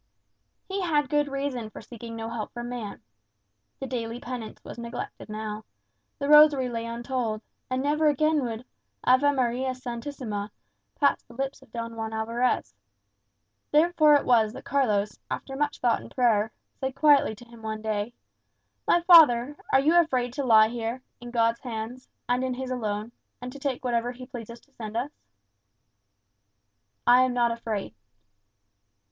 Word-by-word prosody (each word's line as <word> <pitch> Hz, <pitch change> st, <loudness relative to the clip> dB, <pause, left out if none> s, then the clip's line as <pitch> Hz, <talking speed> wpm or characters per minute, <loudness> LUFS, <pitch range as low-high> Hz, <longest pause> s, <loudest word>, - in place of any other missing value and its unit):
He 390 Hz, +1 st, -2 dB
had 295 Hz, -6 st, +1 dB
good 295 Hz, -1 st, +2 dB
reason 275 Hz, -5 st, -3 dB
for -, -, -10 dB
seeking 230 Hz, -1 st, -9 dB
no 225 Hz, 0 st, -5 dB
help 230 Hz, -2 st, -5 dB
from 240 Hz, 0 st, -5 dB
man. 235 Hz, -5 st, -6 dB, 0.8 s
The -, -, -4 dB
daily 235 Hz, -2 st, -4 dB
penance 245 Hz, -3 st, -6 dB
was -, -, -9 dB
neglected 235 Hz, -1 st, -7 dB
now; 215 Hz, 0 st, -5 dB, 0.5 s
the 280 Hz, -, -3 dB
rosary 300 Hz, -3 st, +7 dB
lay 230 Hz, -1 st, -4 dB
untold; 235 Hz, -2 st, -3 dB, 0.3 s
and 255 Hz, +1 st, -1 dB
never 305 Hz, +2 st, +2 dB
again 305 Hz, 0 st, +2 dB
would 235 Hz, 0 st, -4 dB, 0.4 s
"Ave 255 Hz, +3 st, +5 dB
Maria 255 Hz, -1 st, 0 dB
Sanctissima" 235 Hz, -4 st, -5 dB, 0.5 s
pass 280 Hz, -, +3 dB
the 235 Hz, -, -17 dB
lips 270 Hz, +1 st, -3 dB
of 265 Hz, -, -20 dB
Don 230 Hz, -1 st, -5 dB
Juan 220 Hz, 0 st, -4 dB
Alvarez. 230 Hz, -, 0 dB, 1.0 s
Therefore 305 Hz, -1 st, +5 dB
it 285 Hz, -, +2 dB
was 225 Hz, -3 st, +4 dB
that -, -, -10 dB
Carlos, 210 Hz, -7 st, +1 dB
after 270 Hz, -, -5 dB
much 290 Hz, +1 st, -1 dB
thought 240 Hz, -2 st, +2 dB
and -, -, -11 dB
prayer, 225 Hz, -4 st, +2 dB, 0.3 s
said 265 Hz, 0 st, -3 dB
quietly 285 Hz, -5 st, +4 dB
to 240 Hz, -, -14 dB
him 235 Hz, -1 st, -15 dB
one 220 Hz, 0 st, -5 dB
day, 215 Hz, +1 st, -2 dB, 0.7 s
"My 345 Hz, -, +4 dB
father, 295 Hz, -7 st, +7 dB, 0.2 s
are 265 Hz, -, +6 dB
you 305 Hz, +5 st, +3 dB
afraid 255 Hz, -8 st, +2 dB
to 280 Hz, +1 st, -2 dB
lie 220 Hz, -3 st, +6 dB
here, 235 Hz, +2 st, -4 dB, 0.2 s
in 240 Hz, -, -9 dB
God's 230 Hz, -1 st, +1 dB
hands, 240 Hz, +1 st, -6 dB, 0.2 s
and 245 Hz, +1 st, +1 dB
in 255 Hz, -1 st, -1 dB
his 260 Hz, 0 st, -5 dB
alone, 215 Hz, -2 st, -3 dB, 0.3 s
and 250 Hz, +1 st, -6 dB
to 280 Hz, -, -10 dB
take 270 Hz, -2 st, -3 dB
whatever 240 Hz, 0 st, 0 dB
he 250 Hz, +1 st, -10 dB
pleases 235 Hz, -1 st, -9 dB
to 280 Hz, -, -29 dB
send 220 Hz, -3 st, -6 dB
us?" 260 Hz, +5 st, -2 dB, 1.9 s
"I 245 Hz, +1 st, +7 dB
am 255 Hz, -1 st, +2 dB
not 240 Hz, -1 st, +3 dB
afraid." 220 Hz, -, -4 dB
245 Hz, 160 wpm, -27 LUFS, 230-270 Hz, 1.9 s, rosary